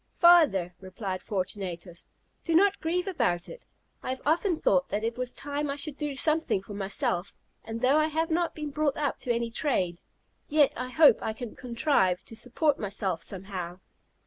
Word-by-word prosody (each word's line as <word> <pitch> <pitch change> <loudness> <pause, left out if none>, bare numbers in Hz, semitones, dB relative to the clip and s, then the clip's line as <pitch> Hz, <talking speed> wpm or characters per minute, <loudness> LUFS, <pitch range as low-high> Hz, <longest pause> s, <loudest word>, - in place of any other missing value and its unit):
"Father," 305 - +5
replied 185 0 -5
Fortunatus, 185 -3 -5 0.4
"do 330 - 0
not 400 +3 +4
grieve 355 +3 -1
about 235 - -1
it. - - -12 0.3
I - - -6
have 260 0 -3
often 340 +3 +2
thought 270 -2 +2
that 210 - -2
it 230 +1 -1
was 250 0 -1
time 290 0 -3
I 280 - -2
should 290 0 -1
do 295 -1 -4
something 305 - +1
for 205 - -9
myself; 195 -2 -1 0.3
and 225 +1 -6
though 260 +4 +4
I 310 0 +3
have 320 +2 -1
not 340 +1 0
been 300 -2 -5
brought 295 -1 0
up 290 -2 -1
to 250 - -2
any 235 0 -1
trade, 190 - -1 0.5
yet 295 -2 +4
I 255 +1 -4
hope 285 -3 +6
I 220 - -2
can 235 0 -8
contrive 235 - +1
to 225 - -7
support 275 +5 0
myself 195 -4 -1
somehow." 185 -2 -5
255 Hz, 180 wpm, -28 LUFS, 195-305 Hz, 0.5 s, hope